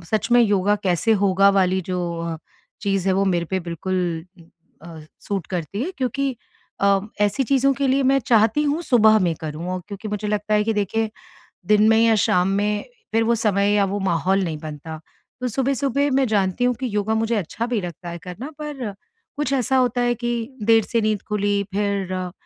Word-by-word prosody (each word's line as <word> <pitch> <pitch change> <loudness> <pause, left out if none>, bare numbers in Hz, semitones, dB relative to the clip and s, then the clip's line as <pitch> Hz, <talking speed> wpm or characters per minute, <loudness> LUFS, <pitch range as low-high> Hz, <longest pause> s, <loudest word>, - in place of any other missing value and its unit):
सच 215 +6 -1
में 245 - +7
योगा 205 -2 +3
कैसे 185 +4 +2
होगा 195 +1 +4
वाली 190 -1 +2
जो 180 - -1 0.2
अ, 165 -1 -3 0.4
चीज़ 195 -2 -1
है 190 - +3
वो 195 +1 +2
मेरे 175 -3 +1
पे 185 +2 -2
बिल्कुल 170 0 -3 0.6
अ, 165 -2 -10 0.2
सूट 195 -5 -4
करती 180 - -4
है, 345 - -2
क्योंकि 265 0 -1 0.4
अ, 200 0 +4 0.2
ऐसी 210 +6 +2
चीज़ों 275 +1 +3
के 275 0 -1
लिए 270 +1 +2
मैं 270 +1 +3
चाहती 225 +4 +3
हूँ 295 +3 0
सुबह 220 -7 +5
में 175 -4 +1
करूँ, 165 +4 -4
क्योंकि 205 +1 -7
मुझे 210 0 -3
लगता 210 0 0
है 210 - +3
कि 225 - +1
देखिए 215 +2 -1 0.6
दिन 210 0 +5
में 225 - +5
या 225 -1 +4
शाम 180 -2 +2
में 210 +1 0 0.3
फिर 225 0 +2
वो 235 +1 +2
समय 205 -2 +1
या 200 -1 +3
वो 200 +1 -2
माहौल 190 +1 +1
नहीं 160 -3 -3
बनता। 155 +1 -8 0.4
तो 250 - 0
सुबह-सुबह 275 +3 0
मैं 270 0 +3
जानती 200 0 0
हूँ 250 0 +3
कि 255 +3 -5
योगा 210 +1 0
मुझे 225 +1 0
अच्छा 210 +4 -3
भी 240 -3 0
लगता 175 0 -7
है 170 - -6
करना 190 - -7
पर 275 -8 -5 0.5
कुछ 295 -3 -1
ऐसा 265 0 +1
होता 250 -1 +1
है 240 0 +2
कि 240 +1 -3 0.3
देर 225 +1 +5
से 230 +2 -1
नींद 215 -2 0
खुली 205 -1 0
फिर 200 -2 -1
अ 185 -1 -3
210 Hz, 200 wpm, -22 LUFS, 185-235 Hz, 0.6 s, में